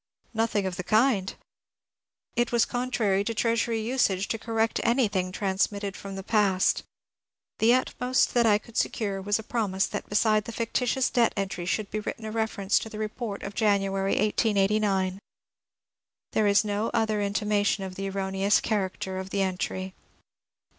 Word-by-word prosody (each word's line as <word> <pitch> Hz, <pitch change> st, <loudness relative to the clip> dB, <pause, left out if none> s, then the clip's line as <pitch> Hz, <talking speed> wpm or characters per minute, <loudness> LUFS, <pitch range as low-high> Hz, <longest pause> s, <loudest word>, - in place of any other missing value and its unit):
Nothing 220 Hz, -3 st, 0 dB
of 185 Hz, -1 st, -3 dB
the 180 Hz, -, -3 dB
kind! 215 Hz, -2 st, +2 dB, 1.0 s
It 240 Hz, 0 st, +1 dB
was 235 Hz, -2 st, +3 dB
contrary 235 Hz, -6 st, 0 dB
to 230 Hz, +2 st, -3 dB
Treasury 230 Hz, 0 st, +1 dB
usage 215 Hz, -5 st, +1 dB
to 225 Hz, -, -2 dB
correct 225 Hz, 0 st, 0 dB
anything 205 Hz, -7 st, +1 dB
transmit 195 Hz, +1 st, 0 dB
ted 200 Hz, -1 st, -3 dB
from 195 Hz, -1 st, -8 dB
the 195 Hz, -, -6 dB
past. 200 Hz, -3 st, +2 dB, 0.8 s
The 235 Hz, +3 st, +5 dB
utmost 255 Hz, 0 st, +1 dB
that 235 Hz, -2 st, +4 dB
I 205 Hz, -1 st, +5 dB
could 225 Hz, +2 st, -15 dB
secure 200 Hz, -3 st, -1 dB
was 205 Hz, +2 st, +1 dB
a 220 Hz, -, -7 dB
pro 225 Hz, -1 st, -1 dB
mise 190 Hz, 0 st, +1 dB
that 205 Hz, -, -5 dB
beside 215 Hz, 0 st, +2 dB
the -, -, -6 dB
fictitious 245 Hz, +3 st, 0 dB
debt 235 Hz, -2 st, +3 dB
entry 190 Hz, -3 st, -3 dB
should 210 Hz, +2 st, -1 dB
be 215 Hz, -, -2 dB
written 220 Hz, +2 st, -5 dB
a 215 Hz, -, -4 dB
reference 220 Hz, -3 st, +1 dB
to 220 Hz, -, -7 dB
the 215 Hz, -, -8 dB
report 215 Hz, -1 st, -4 dB
of 200 Hz, -, -5 dB
January, 195 Hz, -2 st, +1 dB
1889. 200 Hz, -2 st, +1 dB, 1.1 s
There 215 Hz, -1 st, +2 dB
is 200 Hz, +1 st, +4 dB
no 210 Hz, +2 st, -1 dB
other 215 Hz, -2 st, +1 dB
intimation 205 Hz, 0 st, 0 dB
of 190 Hz, -1 st, -6 dB
the 195 Hz, +1 st, -4 dB
erroneous 195 Hz, +1 st, +1 dB
character 190 Hz, -3 st, -2 dB
of 190 Hz, 0 st, -6 dB
the 195 Hz, 0 st, 0 dB
entry. 185 Hz, 0 st, -3 dB
210 Hz, 165 wpm, -27 LUFS, 195-225 Hz, 1.1 s, The